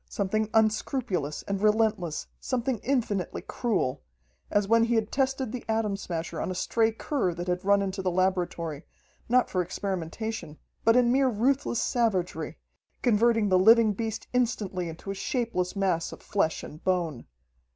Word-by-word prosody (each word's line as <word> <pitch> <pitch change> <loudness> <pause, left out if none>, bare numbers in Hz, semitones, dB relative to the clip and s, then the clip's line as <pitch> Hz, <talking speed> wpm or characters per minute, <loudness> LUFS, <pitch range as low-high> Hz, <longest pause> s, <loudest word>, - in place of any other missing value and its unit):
Something 215 +2 -1
unscrupulous 215 - 0
and 200 -1 -3
relentless, 210 -6 +1
something 250 -2 -1
infinitely 220 -9 -1
cruel 215 - -1 0.5
as 205 -1 +1
when 230 +1 +5
he 235 0 +1
had 220 -1 0
tested 265 -3 0
the 250 - -5
Atom 220 -2 +1
Smasher 170 -4 -4
on - - -2
a 185 - -3
stray 225 +5 +2
cur 220 - -1
that 175 +1 -5
had 180 +1 -1
run 200 0 +4
into 190 0 -3
the 185 - 0
laboratory, 175 -4 -1 0.5
not 250 +1 +4
for 185 - 0
experimentation, 185 -1 -4 0.3
but 225 +1 +5
in 245 -1 +4
mere 265 +1 +4
ruthless 250 +2 +1
savagery, 220 -8 0 0.5
converting 225 -2 +3
the 185 -1 +4
living 220 +2 +6
beast 220 +1 -4
instantly 205 -8 0
into 165 +4 -7
a - - -2
shapeless 195 -3 -2
mass 185 -4 0
of - - -11
flesh 180 -6 0
and 155 - -10
bone. 170 -8 -1
205 Hz, 155 wpm, -27 LUFS, 180-230 Hz, 0.5 s, living